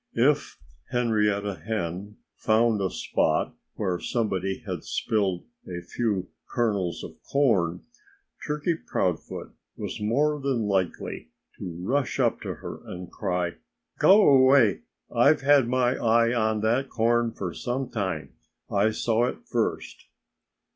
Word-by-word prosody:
If -, -, +2 dB, 0.3 s
Henrietta 105 Hz, -4 st, 0 dB
Hen 105 Hz, -1 st, -4 dB, 0.2 s
found 110 Hz, -1 st, +2 dB
a 95 Hz, -, +1 dB
spot -, -, 0 dB, 0.2 s
where 90 Hz, -2 st, -1 dB
somebody 95 Hz, -5 st, -2 dB
had -, -, -4 dB
spilled 95 Hz, -5 st, -1 dB, 0.2 s
a 90 Hz, -1 st, -5 dB
few 100 Hz, -2 st, -2 dB, 0.2 s
kernels 100 Hz, -8 st, -1 dB
of -, -, -10 dB
corn 105 Hz, -12 st, +1 dB, 0.6 s
Turkey 150 Hz, +3 st, 0 dB
Proudfoot 90 Hz, -, -3 dB, 0.3 s
was -, -, -5 dB
more 145 Hz, +8 st, +1 dB
than 135 Hz, -4 st, 0 dB
likely 95 Hz, -4 st, -2 dB, 0.3 s
to 85 Hz, -2 st, -6 dB
rush 130 Hz, +5 st, 0 dB
up -, -, +2 dB
to -, -, -4 dB
her -, -, -8 dB
and 90 Hz, 0 st, -8 dB
cry, 90 Hz, -3 st, -2 dB, 0.4 s
"Go 205 Hz, +2 st, +7 dB
away! 130 Hz, -, +6 dB, 0.4 s
I've 145 Hz, +6 st, +5 dB
had 140 Hz, -2 st, +5 dB
my 125 Hz, 0 st, +2 dB
eye 115 Hz, +1 st, +3 dB
on 110 Hz, -2 st, +1 dB
that 120 Hz, +5 st, +1 dB
corn 120 Hz, +1 st, +2 dB
for 95 Hz, -6 st, -5 dB
some 130 Hz, +2 st, -3 dB
time. 95 Hz, -9 st, -3 dB, 0.4 s
I 100 Hz, +2 st, +3 dB
saw 115 Hz, +1 st, +1 dB
it -, -, -6 dB
first." -, -, -2 dB
110 Hz, 125 wpm, -26 LUFS, 95-125 Hz, 0.6 s, Go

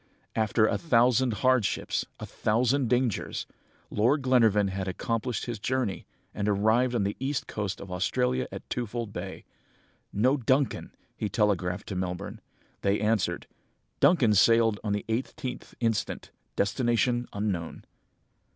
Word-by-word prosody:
"After 110 Hz, 0 st, +3 dB
a -, -, +1 dB
thousand 125 Hz, -3 st, +3 dB
hardships, 130 Hz, -5 st, +1 dB
a -, -, -5 dB
thousand 125 Hz, +4 st, +1 dB
dangers, 125 Hz, -4 st, 0 dB, 0.5 s
Lord 130 Hz, +7 st, +2 dB
Glenarvan 110 Hz, -6 st, +4 dB
had 95 Hz, 0 st, -3 dB
accomplished 115 Hz, +4 st, -2 dB
his 120 Hz, -4 st, -4 dB
journey, 125 Hz, -3 st, -2 dB, 0.3 s
and 105 Hz, 0 st, -1 dB
arrived 110 Hz, +5 st, +2 dB
on 110 Hz, -, +1 dB
the 100 Hz, +1 st, -1 dB
east 135 Hz, +1 st, -2 dB
coast 100 Hz, -2 st, -4 dB
of 95 Hz, -, -9 dB
Australia, 65 Hz, -9 st, 0 dB
at -, -, -8 dB
Twofold 115 Hz, -2 st, -4 dB
Bay. 95 Hz, +2 st, -6 dB, 0.7 s
'No 130 Hz, +7 st, +2 dB
Duncan!' 130 Hz, +2 st, 0 dB, 0.2 s
he 105 Hz, -, -3 dB
telegraphed 100 Hz, -3 st, 0 dB
to 100 Hz, -, -4 dB
Melbourne. 90 Hz, -1 st, -4 dB, 0.4 s
They 100 Hz, +1 st, +1 dB
answered, 105 Hz, -5 st, 0 dB, 0.5 s
'Duncan 140 Hz, -7 st, +5 dB
sailed 115 Hz, +1 st, +4 dB
on 105 Hz, -2 st, -1 dB
the 105 Hz, -, -2 dB
18th 125 Hz, +3 st, -4 dB
instant. 115 Hz, -3 st, -1 dB, 0.2 s
Destination 120 Hz, +2 st, +1 dB
unknown.' 100 Hz, -5 st, -3 dB
110 Hz, 130 wpm, -28 LUFS, 100-125 Hz, 0.7 s, Duncan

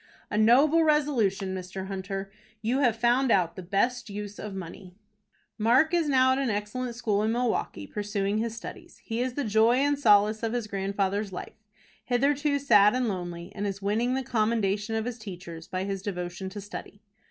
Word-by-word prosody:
"A -, -, -1 dB
noble 280 Hz, +9 st, +5 dB
resolution, 235 Hz, -11 st, +1 dB
Mr. 190 Hz, +1 st, -6 dB
Hunter! 195 Hz, 0 st, -5 dB, 0.3 s
You 245 Hz, +5 st, +1 dB
have 245 Hz, -6 st, +3 dB
found 240 Hz, +3 st, +2 dB
out 175 Hz, -5 st, +2 dB
the 185 Hz, -, -6 dB
best 205 Hz, +7 st, 0 dB
use 205 Hz, 0 st, -6 dB
of 210 Hz, -2 st, -6 dB
money." 185 Hz, 0 st, -9 dB, 0.6 s
Mark 255 Hz, +10 st, +4 dB
is 335 Hz, -3 st, +2 dB
now 260 Hz, -1 st, +4 dB
at 260 Hz, -, +1 dB
an 270 Hz, -3 st, 0 dB
excellent 225 Hz, +4 st, -3 dB
school 210 Hz, -4 st, 0 dB
in 220 Hz, +1 st, +1 dB
Milwaukie, 235 Hz, -, -1 dB
pursuing 205 Hz, -, -2 dB
his 230 Hz, 0 st, -3 dB
studies. -, -, -9 dB
He 230 Hz, +1 st, -3 dB
is 250 Hz, 0 st, -2 dB
the 285 Hz, -, -1 dB
joy 220 Hz, +1 st, +4 dB
and 285 Hz, +2 st, +1 dB
solace 210 Hz, -3 st, +4 dB
of 225 Hz, 0 st, -2 dB
his 240 Hz, -2 st, -1 dB
grandfather's 200 Hz, 0 st, -2 dB
life, 180 Hz, -, -7 dB, 0.5 s
hitherto 285 Hz, +3 st, +1 dB
sad 210 Hz, -6 st, +5 dB
and 255 Hz, -1 st, +1 dB
lonely, 175 Hz, -2 st, -5 dB
and 205 Hz, 0 st, -3 dB
is 195 Hz, 0 st, -4 dB
winning 230 Hz, +5 st, +1 dB
the 265 Hz, -, -1 dB
commendation 220 Hz, -2 st, 0 dB
of 220 Hz, 0 st, -1 dB
his 245 Hz, -1 st, -5 dB
teachers 175 Hz, -5 st, -9 dB
by 185 Hz, 0 st, -3 dB
his 195 Hz, -1 st, -3 dB
devotion 180 Hz, -1 st, -4 dB
to 205 Hz, +2 st, -7 dB
study. 205 Hz, +1 st, -9 dB
215 Hz, 185 wpm, -27 LUFS, 195-245 Hz, 0.6 s, noble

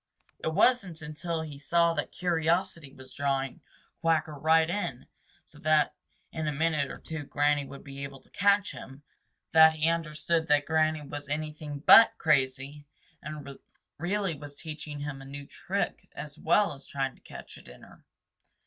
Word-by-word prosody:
It -, -, -4 dB
wasn't 195 Hz, -7 st, +2 dB
until 160 Hz, +2 st, -4 dB
he 145 Hz, -3 st, -8 dB
saw 170 Hz, +4 st, +3 dB
that -, -, -3 dB
curiosity 170 Hz, -2 st, 0 dB
was 130 Hz, -1 st, -13 dB
drawing 135 Hz, -2 st, -1 dB, 0.4 s
Quacker 160 Hz, -2 st, +1 dB
right 160 Hz, +2 st, +3 dB
in 170 Hz, -9 st, -3 dB, 0.4 s
so -, -, -19 dB
that 155 Hz, -1 st, +3 dB, 0.4 s
in 160 Hz, -1 st, -3 dB
a -, -, +1 dB
minute 150 Hz, -1 st, 0 dB
or -, -, -7 dB
two 160 Hz, -1 st, -6 dB
Granny 145 Hz, 0 st, +1 dB
would 140 Hz, -, -11 dB
be 140 Hz, -1 st, -9 dB
able 140 Hz, -1 st, -7 dB
to -, -, -24 dB
catch 200 Hz, 0 st, +3 dB
him, 135 Hz, +2 st, -11 dB, 0.5 s
that 160 Hz, 0 st, +8 dB
he 155 Hz, 0 st, 0 dB
understood 165 Hz, 0 st, -1 dB
that 145 Hz, -1 st, +3 dB
Granny 155 Hz, -1 st, +1 dB
was 145 Hz, 0 st, -7 dB
anything 150 Hz, -1 st, -4 dB
but 230 Hz, -, +9 dB
crazy, 140 Hz, -1 st, 0 dB, 0.3 s
and 145 Hz, -2 st, -8 dB, 0.4 s
really 195 Hz, +2 st, 0 dB
was 145 Hz, -1 st, -10 dB
teaching 150 Hz, -2 st, -7 dB
him 145 Hz, -2 st, -5 dB
a -, -, -10 dB
new 140 Hz, +1 st, -8 dB
trick 195 Hz, +7 st, -3 dB
as 150 Hz, -1 st, -7 dB
well 205 Hz, +3 st, +2 dB
as 140 Hz, 0 st, -13 dB
trying 135 Hz, -1 st, -2 dB
to -, -, -24 dB
catch -, -, -11 dB
a -, -, -13 dB
dinner. 60 Hz, 0 st, -15 dB
150 Hz, 165 wpm, -29 LUFS, 140-165 Hz, 0.5 s, but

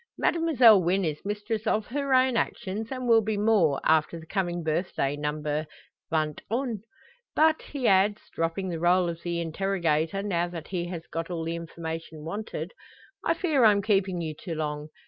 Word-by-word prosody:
Mademoiselle 260 Hz, -, +5 dB
Wynn 180 Hz, +2 st, +1 dB
is 155 Hz, -2 st, -3 dB
mistress 210 Hz, +2 st, -3 dB
of 215 Hz, -1 st, +1 dB
her 280 Hz, +2 st, -3 dB
own 255 Hz, -1 st, +4 dB
actions, 210 Hz, -1 st, -2 dB
and 255 Hz, -2 st, -3 dB
will 225 Hz, -1 st, +6 dB
be 215 Hz, -1 st, -2 dB
more, 200 Hz, -10 st, +3 dB
after 160 Hz, +1 st, +2 dB
the 160 Hz, -, -12 dB
coming 175 Hz, -1 st, -2 dB
birthday 155 Hz, -3 st, -1 dB
number 150 Hz, +1 st, -2 dB, 0.4 s
vingt 155 Hz, -2 st, 0 dB
un. 235 Hz, -2 st, -2 dB, 0.5 s
But," 315 Hz, 0 st, +4 dB
he 275 Hz, -4 st, -3 dB
adds, 200 Hz, +2 st, +4 dB
dropping 165 Hz, +3 st, -1 dB
the 165 Hz, -2 st, -3 dB
role 175 Hz, +1 st, +3 dB
of 170 Hz, 0 st, -6 dB
the 170 Hz, -1 st, -2 dB
interrogator, 170 Hz, 0 st, 0 dB
now 175 Hz, -4 st, 0 dB
that 170 Hz, -2 st, -8 dB
he 175 Hz, -2 st, -2 dB
has 170 Hz, -2 st, -6 dB
got 165 Hz, +1 st, -5 dB
all 170 Hz, -2 st, -3 dB
the 165 Hz, +1 st, -2 dB
information 165 Hz, -1 st, -6 dB
wanted, 205 Hz, +6 st, -5 dB, 0.5 s
"I -, -, +2 dB
fear 305 Hz, -8 st, +2 dB
I'm 205 Hz, -2 st, +5 dB
keeping 195 Hz, -4 st, +1 dB
you 160 Hz, -2 st, -3 dB
too 165 Hz, +2 st, -6 dB
long. 150 Hz, -1 st, -3 dB
180 Hz, 175 wpm, -27 LUFS, 165-215 Hz, 0.5 s, will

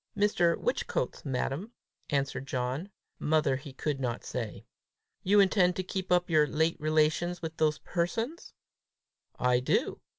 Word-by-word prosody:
"Mr. 180 Hz, -5 st, +3 dB
Whichcote's, -, -, -2 dB
madam," 140 Hz, -, -2 dB, 0.4 s
answered 135 Hz, -2 st, -1 dB
John: 130 Hz, +8 st, -2 dB, 0.3 s
mother 150 Hz, -3 st, +2 dB
he 135 Hz, +1 st, -7 dB
could 140 Hz, +1 st, -2 dB
not 120 Hz, -3 st, -2 dB
say. 115 Hz, -4 st, -5 dB, 0.6 s
"You 205 Hz, +2 st, +4 dB
intend 185 Hz, -2 st, +4 dB
to 185 Hz, -, -2 dB
keep 185 Hz, 0 st, -4 dB
up 180 Hz, 0 st, +4 dB
your 155 Hz, -3 st, +4 dB
late 160 Hz, +2 st, +1 dB
relations 155 Hz, +3 st, +1 dB
with 160 Hz, 0 st, -5 dB
those 155 Hz, -1 st, +2 dB
persons?" 225 Hz, -, -3 dB, 0.8 s
"I 125 Hz, 0 st, +3 dB
do." 125 Hz, -, 0 dB
155 Hz, 135 wpm, -30 LUFS, 135-180 Hz, 0.8 s, You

